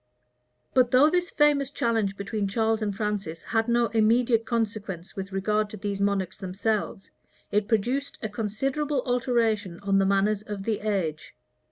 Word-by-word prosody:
But 250 -2 +4
though 270 +5 +5
this 355 0 +1
famous 290 -2 +3
challenge 225 -7 0
between 200 0 -2
Charles 220 +2 +1
and 205 -2 -1
Francis 205 -6 -3
had 225 0 0
no 235 0 +3
immediate 230 +1 +3
consequence 210 -7 -3
with 195 0 -5
regard 210 +2 0
to 215 - -8
these 200 0 -3
monarchs 195 -2 0
themselves, 195 +1 -2 0.4
it 205 0 +1
produced 245 +6 0
a - - 0
considerable 260 +7 -2
alteration 230 -7 0
on 195 -1 +2
the 195 - +3
manners 200 +1 +2
of 210 -2 -6
the 220 0 -1
age. 190 -8 -2
215 Hz, 155 wpm, -26 LUFS, 200-235 Hz, 0.4 s, though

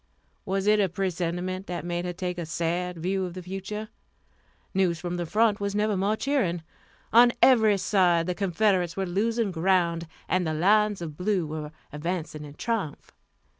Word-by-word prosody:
Was 195 0 -1
it 210 0 +4
a 195 -2 +2
presentiment 180 +1 -2
that 175 -1 -4
made 175 0 -2
her 180 - -2
take 180 0 -4
a 170 - -3
sad 170 +2 -2
view 190 +3 -1
of 180 -1 -5
the 185 - -7
future? 195 +4 -5 0.8
News 180 -3 +1
from 175 +1 -3
the 175 -1 -3
front 215 +2 +2
was 200 0 -2
never 210 0 +1
more 200 +3 +1
cheering. 220 - 0 0.5
On 240 +1 +8
every 220 -7 +5
side 180 -3 +3
the 180 - -1
Confederates 185 -1 +1
were 195 - 0
losing 215 +4 0
ground, 170 -1 +1 0.2
and 185 -2 +1
the 155 - -1
lines 205 +3 +3
of 155 -3 -7
blue 185 -2 0
were 150 -1 -5 0.2
advancing 155 -1 -4
in 145 -1 -10
triumph. 210 -10 -3
185 Hz, 170 wpm, -27 LUFS, 170-205 Hz, 0.8 s, On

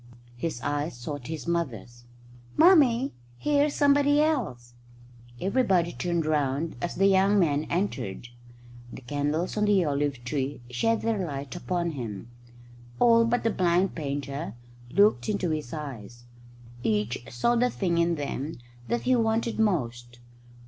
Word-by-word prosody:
His 140 0 -3
eyes 145 -1 -2
sought 130 +1 -6
his 160 0 -5
mother's. 120 - -3 0.5
"Mummy, 280 -7 +5 0.2
here's 290 - +1
somebody 285 0 +4
else." 210 - -1 0.7
Everybody 190 -5 +2
turned 170 -2 -1
round 150 +1 0
as 175 - -3
the 195 - +3
young 195 +1 +4
man 155 -5 +2
entered. 130 - -3 0.6
The - - -9
candles 145 - -2
on 210 - +2
the 200 -4 +3
olive 140 -3 -1
tree 135 +1 -3
shed 225 - +1
their 220 -4 0
light 140 -2 -5
upon 175 -1 -2
him. 115 -5 -6 0.7
All 230 -1 +5
but 240 +1 0
the 225 - +2
blind 180 0 +2
painter 140 -4 -4 0.3
looked 205 - +3
into 195 -5 0
his 155 -6 -3
eyes. 120 -6 -7 0.6
Each 110 +2 -1
saw 125 - +1
the 250 +1 +3
thing 175 -7 0
in 170 0 +2
them 145 0 -4 0.3
that 235 - 0
he 255 0 +3
wanted 225 0 0
most. 120 - -1
165 Hz, 135 wpm, -27 LUFS, 135-210 Hz, 0.7 s, Mummy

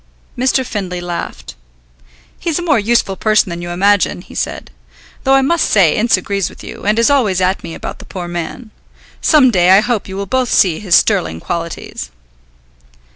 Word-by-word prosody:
Mr. 260 +1 +1
Findlay 190 -6 -4
laughed. 175 -1 -6 0.9
"He's 335 -3 -1
a 350 - -3
more 295 -8 +2
useful 210 -2 +1
person 215 -1 +2
than 170 0 -5
you 175 - -6
imagine," 195 +2 +1
he - - -15
said. - - -4 0.5
"Though 270 0 +4
I 270 - +4
must 335 +5 +1
say 185 -7 +4
Ince 230 +2 +3
agrees 200 -3 -2
with - - -14
you, - - -9
and 210 +1 +2
is 230 +4 +3
always 215 -10 +2
at 185 +1 0
me 165 - -7
about - - -7
the - - -11
poor 180 -2 -7
man. 175 +7 -6 0.5
Some 285 -6 +5
day 180 -3 +3
I 190 +2 +7
hope 235 -2 -2
you 190 0 -7
will 200 - -3
both 255 +4 0
see 170 -5 +3
his 185 -5 +2
sterling 80 - +2
qualities." 165 - -5
200 Hz, 185 wpm, -16 LUFS, 175-240 Hz, 0.9 s, I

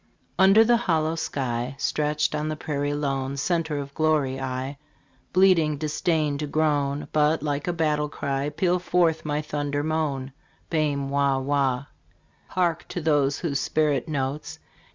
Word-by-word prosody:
Under 195 +4 +7
the 235 +1 +4
hollow 160 -8 +1
sky, 130 -5 -3
Stretched 150 +2 0
on 150 0 -1
the 155 - -2
prairie 145 -1 -2
lone, 135 -2 -2
Center 160 0 0
of 140 -1 -6
glory, 150 -4 +1
I, 130 +2 -4 0.5
Bleeding, 175 -5 +4
disdain 155 -1 0
to 150 - -2
groan, 145 -2 0
But 150 0 +2
like 145 0 -2
a - - +2
battle 150 -3 0
cry 140 0 -2
Peal 180 +3 +1
forth 175 -3 +1
my 150 0 -1
thunder 145 -1 -2
moan. 145 -4 -2 0.4
Bairn 145 -4 0
wah 140 -1 +2
wah! 135 -1 0 0.6
Hark 175 -2 0
to - - -4
those 145 -3 +2 0.2
spirit 150 -5 +1
notes 150 +2 -3
150 Hz, 140 wpm, -25 LUFS, 140-160 Hz, 0.6 s, Under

